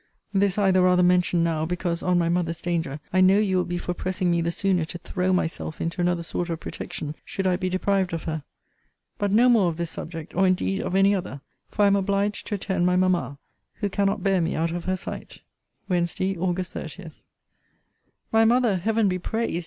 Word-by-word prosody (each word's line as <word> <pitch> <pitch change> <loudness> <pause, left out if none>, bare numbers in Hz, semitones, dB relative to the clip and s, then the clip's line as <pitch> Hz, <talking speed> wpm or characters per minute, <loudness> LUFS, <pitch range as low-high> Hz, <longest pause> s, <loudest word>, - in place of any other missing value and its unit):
This 195 -1 +2
I 200 -2 +3
the 185 0 +4
rather 180 0 +4
mention 180 -1 +3
now, 160 -2 0
because, 175 0 -2
on 180 -1 +2
my 170 -1 +2
mother's 170 -1 0
danger, 165 -5 -2
I 185 - +4
know 190 +2 +6
you 200 -3 +2
will 180 - +2
be 175 - -3
for 180 - -3
pressing 185 0 -1
me 170 0 +2
the 170 0 0
sooner 185 -1 +1
to 165 +2 -6
throw 185 +1 -2
myself 165 -3 -2
into 165 +2 -2
another 175 -1 +1
sort 175 +1 -3
of 165 -1 -3
protection, 150 -2 -6
should 195 - -4
I 185 -1 +3
be 185 0 -2
deprived 190 0 0
of 165 -1 -4
her. 160 -2 -4 0.8
But 205 -1 0
no 230 +5 +5
more 220 -7 +4
of 160 - -5
this 170 -1 -3
subject, 165 -1 -7
or 190 +1 +3
indeed 190 +1 0
of 185 - -3
any 195 +1 +5
other; 175 -8 -4 0.3
for 210 - 0
I - - +7
am 200 0 +4
obliged 200 +1 0
to 210 - -1
attend 190 -2 -1
my 180 - +2
mamma, 180 -7 +1 0.4
who 205 - -2
cannot 200 0 0
bear 195 -2 +2
me 165 - -1
out 165 +1 0
of 175 0 -4
her 185 - 0
sight. - - -8 0.4
WEDNESDAY, 180 +1 0
AUG. 180 +1 -1
30. 170 0 -8 1.2
My 225 0 +5
mother, 235 -3 +3
Heaven 220 +3 +1
be 185 -1 0
praised! 220 -2 -2
180 Hz, 215 wpm, -25 LUFS, 170-195 Hz, 1.2 s, I